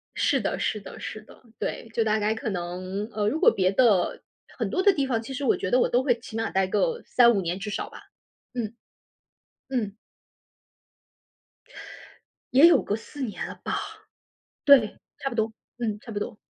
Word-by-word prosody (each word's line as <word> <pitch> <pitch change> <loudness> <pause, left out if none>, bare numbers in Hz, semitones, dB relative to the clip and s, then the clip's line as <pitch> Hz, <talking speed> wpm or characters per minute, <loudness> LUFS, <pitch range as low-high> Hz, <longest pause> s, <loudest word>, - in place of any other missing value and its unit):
是 - - +2
的 - - -2
是 215 - -1
的 195 - -10
是 215 - -6
的， - - -18 0.2
对， - - -4
就 230 - +2
大 215 0 +2
概 215 +1 +1
可 225 0 -3
能 185 +3 -4
呃， 210 -1 0
如 300 - 0
果 - - +7
别 185 -1 +2
的 210 -5 +3 0.4
很 - - -1
多 370 - 0
的 400 - +6
地 280 -6 0
方， 230 -4 0
其 270 - -7
实 280 +2 -4
我 - - +3
觉 185 - -3
得 250 - +4
我 - - +3
都 245 +1 +2
会 245 -3 +2
起 225 -1 -9
码 225 - -1
待 190 0 +2
个 475 - 0
3-5 235 -4 +5
年 175 +1 -2
至 210 +1 -5
少 - - -3
吧。 - - -12 0.5
嗯。 230 -2 -3 1.0
嗯。 215 -6 -2 2.6
也 275 +6 +9
有 345 - +6
个 205 - -1
4 280 +5 -9
年 220 -5 -3
了 - - -8
吧。 - - -1 0.9
对， 270 -7 +6 0.2
差 275 - -2
不 235 - -6
多。 220 0 0 0.3
嗯， 215 -4 -2
差 230 - -10
不 205 - -3
多。 215 0 -5
225 Hz, 195 characters per minute, -26 LUFS, 205-255 Hz, 2.6 s, 也